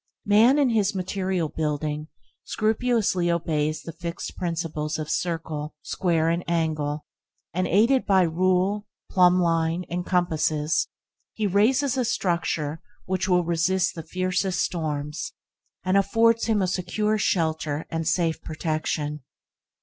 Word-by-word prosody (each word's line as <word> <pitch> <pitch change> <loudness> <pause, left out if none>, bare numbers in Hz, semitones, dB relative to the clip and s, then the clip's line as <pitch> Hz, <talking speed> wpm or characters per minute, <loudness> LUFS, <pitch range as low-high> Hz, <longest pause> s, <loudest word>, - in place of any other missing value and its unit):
Man 225 +6 +5
in 275 -4 +3
his 210 -3 +1
material 185 -2 -1
building 150 0 -2 0.4
scrupulously 215 -5 +1
obeys 155 -2 0
the 165 - -6
fixed 170 0 -6
principles 165 -3 -2
of 155 -1 -4
circle, 160 -3 -3
square 165 -3 0
and 170 +1 0
angle, 155 -3 -1 0.5
and, 185 +2 0
aided 230 +9 +3
by 190 -2 +5
rule, 185 +4 +1 0.2
plumbline, 175 -2 +3
and 175 +1 -1
compasses, 160 -4 +1 0.5
he 215 - -1
raises 250 +8 +2
a 255 - +2
structure 170 -8 -1 0.2
which 190 +1 -1
will 180 -1 +4
resist 175 +2 +1
the 165 - -6
fiercest 185 +2 -1
storms, 150 - -3 0.5
and 185 +1 +1
afford 225 +3 +3
him 215 -3 +2
a - - +1
secure 210 +4 0
shelter 160 -5 0
and 165 -1 -2
safe 165 -1 +1
protection. 155 -2 -2
175 Hz, 125 wpm, -25 LUFS, 160-195 Hz, 0.5 s, Man